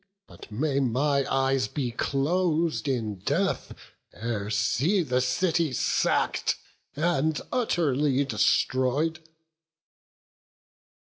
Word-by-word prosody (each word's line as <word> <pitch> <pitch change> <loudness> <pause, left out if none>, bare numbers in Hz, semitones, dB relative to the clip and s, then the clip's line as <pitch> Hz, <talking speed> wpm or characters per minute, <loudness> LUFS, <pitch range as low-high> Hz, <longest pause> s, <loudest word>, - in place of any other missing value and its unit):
But - - -14
may 140 +5 0
my 140 +2 +1
eyes 135 -3 +1
be 125 +2 -3
clos'd 160 +5 0
in 110 -7 -2
death, - - -1 0.4
ere 110 -3 -4
see 130 - +1
The 130 -3 0
city 160 +3 +1
sack'd, - - +1 0.4
and 155 -1 +1
utterly 150 - +1
destroy'd." 130 - +1
135 Hz, 85 wpm, -26 LUFS, 125-160 Hz, 0.4 s, my